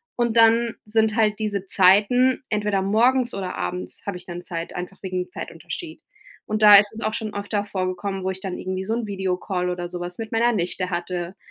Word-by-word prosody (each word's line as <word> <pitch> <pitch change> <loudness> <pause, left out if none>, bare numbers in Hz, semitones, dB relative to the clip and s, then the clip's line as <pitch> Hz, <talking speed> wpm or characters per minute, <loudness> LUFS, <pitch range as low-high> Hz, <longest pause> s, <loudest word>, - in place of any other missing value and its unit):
und 240 -2 0
dann 230 0 +4
sind 220 0 +2
halt 215 -2 +2
diese 205 -3 -2
Zeiten 210 +9 +4
entweder 210 -2 0
morgens 240 +5 +2
oder 190 -2 -4
abends 90 -1 -5
habe 200 -3 -3
ich 180 - -13
dann 175 0 -7
Zeit, 170 -1 -6
einfach 180 +2 -6
wegen 185 -1 -3
dem 180 - -21
Zeitunterschied. 320 -2 -7 0.4
Und 215 0 -2
da 210 -1 +10
ist 205 +1 +4
es 220 - -6
auch 215 -1 -1
schon 215 -2 -4
öfter 205 0 -2
vorgekommen, 190 0 -3
wo - - +1
ich 190 - -7
dann 190 -2 -4
irgendwie 185 0 -4
so 220 +4 -2
'n 235 -1 -2
Videocall 185 -2 -2
oder 175 -1 -3
sowas 175 0 -6
mit 225 -1 -6
meiner 235 +2 +3
Nichte 180 -3 -2
hatte, 175 0 -3
200 Hz, 205 wpm, -23 LUFS, 180-220 Hz, 0.4 s, da